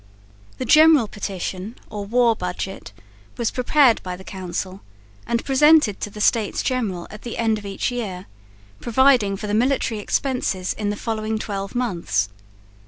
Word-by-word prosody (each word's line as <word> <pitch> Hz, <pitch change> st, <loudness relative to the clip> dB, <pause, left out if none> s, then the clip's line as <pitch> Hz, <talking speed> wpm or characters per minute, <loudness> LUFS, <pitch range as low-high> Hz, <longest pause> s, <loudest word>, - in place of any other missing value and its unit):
The 255 Hz, -, -3 dB
General 305 Hz, -3 st, +6 dB
Petition 195 Hz, +1 st, -5 dB, 0.2 s
or 205 Hz, -1 st, -5 dB
War 235 Hz, +1 st, +3 dB
Budget 180 Hz, -, -5 dB, 0.5 s
was 235 Hz, -2 st, 0 dB
prepared 250 Hz, -1 st, +3 dB
by 180 Hz, -1 st, -5 dB
the 190 Hz, -, -12 dB
Council 185 Hz, 0 st, -5 dB, 0.5 s
and 235 Hz, -, -1 dB
presented 295 Hz, -5 st, +4 dB
to -, -, -3 dB
the 210 Hz, -, -10 dB
States 215 Hz, 0 st, +1 dB
General 215 Hz, -10 st, -2 dB
at 215 Hz, -, -10 dB
the 240 Hz, -, -6 dB
end 220 Hz, -2 st, +1 dB
of 205 Hz, -, -9 dB
each 195 Hz, +5 st, -2 dB
year, 200 Hz, -7 st, -4 dB, 0.5 s
providing 240 Hz, -5 st, +3 dB
for 210 Hz, -, -6 dB
the 205 Hz, -, -3 dB
military 235 Hz, -1 st, +1 dB
expenses 205 Hz, -5 st, -1 dB
in 210 Hz, -1 st, -3 dB
the 205 Hz, -, -1 dB
following 220 Hz, 0 st, -2 dB
twelve 200 Hz, -1 st, -5 dB
months. 170 Hz, -, 0 dB
215 Hz, 155 wpm, -22 LUFS, 195-245 Hz, 0.5 s, General